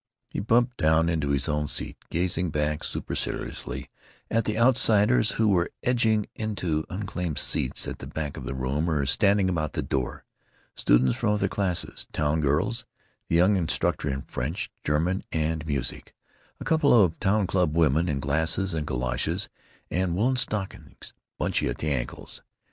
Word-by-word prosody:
He - - -3
bumped 120 +4 +2
down 80 +1 +3
into 80 -4 0
his 70 -2 +1
own 75 -1 0
seat, - - 0
gazing 90 0 0
back 75 0 -1
superciliously - - -3 0.4
at 115 0 +2
the 110 0 -1
outsiders 110 - +4
who 110 - +2
were 90 -4 +2
edging 110 -4 +2
into 90 -8 -2
unclaimed 90 -5 -4
seats 65 - 0
at - - -5
the - - -7
back 75 -2 -4
of - - -7
the 65 - -4
room 70 +6 -1
or 75 -4 +1
standing 100 - +3
about 80 -5 -1
the - - -2
door—students 65 -1 -1
from 105 - +1
other 105 - +1
classes, 95 -4 -2
town 75 +1 +1
girls, 80 - 0 0.4
the - - 0
young 90 +4 +5
instructor 80 -4 0
in 70 0 -3
French, 70 +9 -4
German, 80 +6 0
and 80 0 -1
music; 70 -4 -3 0.4
a - - -6
couple 160 -3 +3
of 90 -6 +3
town 100 +1 +2
club 90 -4 +1
women 80 +2 +3
in 70 - -1
glasses 80 +7 0
and 75 -2 -2
galoshes 65 -2 -1 0.4
and 90 -1 0
woolen 120 +7 +2
stockings 105 -5 -3 0.3
bunchy - - 0
at - - -3
the 75 - -2
ankles. - - -4
80 Hz, 160 wpm, -26 LUFS, 75-100 Hz, 0.4 s, young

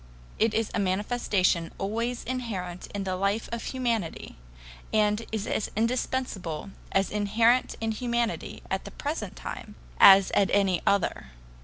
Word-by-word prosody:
It 225 0 +2
is 225 -1 0
a - - 0
manifestation 190 -3 +1
always 230 +5 -2
inherent 200 -9 -4
in 200 -1 -4
the 185 -1 -2
life 200 +4 0
of 235 0 -4
humanity, 235 -9 -2 0.6
and 210 0 +2
is 220 -2 -2
as 215 - -1
indispensable, 220 -7 -2 0.2
as 195 -1 +1
inherent 225 +4 +2
in 225 0 -1
humanity 235 0 -2
at - - -1
the - - -6
present 295 +3 -4
time 210 - -7 0.2
as 195 -1 +8
at 195 -3 +3
any 195 -3 +3
other. 200 - +1
210 Hz, 140 wpm, -27 LUFS, 195-235 Hz, 0.6 s, as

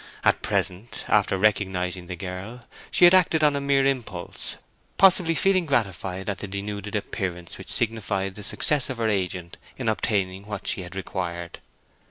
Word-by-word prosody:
At - - +3
present, 95 +6 -2
after 95 - +3
recognizing 95 -3 0
the 90 - -5
girl, 95 +7 -7 0.3
she 175 - +6
had 175 - +8
acted 170 -4 +4
on 145 -1 +4
a 140 - -1
mere 140 -1 +3
impulse, 120 -10 -3 0.4
possibly 180 -3 +5
feeling 185 -1 +3
gratified 95 - -1
at 100 -1 -2
the 100 - -5
denuded 100 +1 -5
appearance 90 -4 -4
which - - -6
signified 105 -4 0
the 105 - -10
success 140 +6 +2
of 130 - -4
her 115 -1 +1
agent 90 -3 -2 0.2
in 125 - -4
obtaining 100 -3 0
what 105 -2 -5
she - - 0
had 90 +1 -9
required. 85 -3 -4
100 Hz, 165 wpm, -25 LUFS, 95-125 Hz, 0.4 s, had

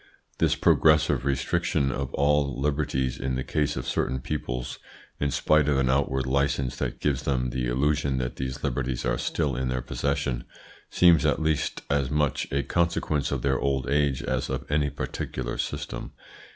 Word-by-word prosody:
This - - +3
progressive 80 -3 +4
restriction 70 +1 +1
of 65 0 -3
all 70 -2 +2
liberties 70 -3 0
in 65 0 -1
the 65 - -2
case 75 +2 0
of 65 - -3
certain 65 +1 0
peoples, 60 -3 -4 0.4
in 70 - +1
spite 75 +2 +3
of 70 - +2
an 65 -1 +2
outward 65 -1 +1
license 70 -1 0
that - - -3
gives 70 -2 0
them 65 -3 0
the 60 0 -1
illusion 70 +2 +1
that 65 -1 -3
these 65 0 -4
liberties 65 -2 -1
are - - 0
still 75 -6 -1
in 65 +1 -1
their 65 0 -2
possession, 70 -3 -2 0.4
seems 85 -5 +5
at - - +2
least 80 -2 -1
as 70 -2 +1
much 75 -1 0
a 70 0 +1
consequence 85 -4 0
of - - -2
their 65 -2 +2
old 65 -2 0
age 70 -2 +1
as - - -1
of 65 -1 -3
any 75 -1 +2
particular 65 -2 -4
system. - - -4
70 Hz, 170 wpm, -26 LUFS, 65-75 Hz, 0.4 s, seems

